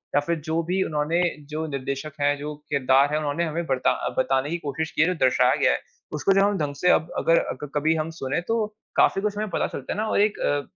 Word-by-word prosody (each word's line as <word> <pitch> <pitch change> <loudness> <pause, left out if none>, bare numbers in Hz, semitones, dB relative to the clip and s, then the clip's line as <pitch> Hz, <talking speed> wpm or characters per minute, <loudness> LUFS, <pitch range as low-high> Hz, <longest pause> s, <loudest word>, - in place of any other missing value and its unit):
या - - +6
फिर 170 -1 0
जो 165 +1 +1
भी 180 +3 0
उन्होंने 155 +2 0 0.3
जो 155 +1 -3
निर्देशक 140 +1 -4
है, 145 0 +3
जो 150 +1 -5 0.2
किरदार 135 0 +3
है 150 - +1
उन्होंने 155 +2 -1
हमें 165 +1 -3
बरता 130 -4 +1 0.2
बताने 135 +2 +1
की 170 - -1
कोशिश 155 +3 -3
की - - 0
है, 160 - +5
जो 180 - +1
दर्शाया 130 - +4
गया - - +3
है - - 0 0.3
उसको 155 +6 +2
जब 195 - +4
हम 205 0 +2
ढंग 145 -3 -2
से 180 +6 +1
अब 160 +1 +1
अगर 165 - +3
अ, - - -3
क 145 - -5
कभी 155 +2 +2
हम 155 0 -2
सुने 135 +4 -1
तो 225 -1 +1 0.3
काफ़ी 195 - +3
कुछ 205 0 -2
हमे 215 +1 -1
पता - - +1
चलता 135 - -5
है - - -7
ना 215 - 0
और - - +1
एक 210 0 +1
अ, 145 0 +1
155 Hz, 255 wpm, -24 LUFS, 145-170 Hz, 0.3 s, या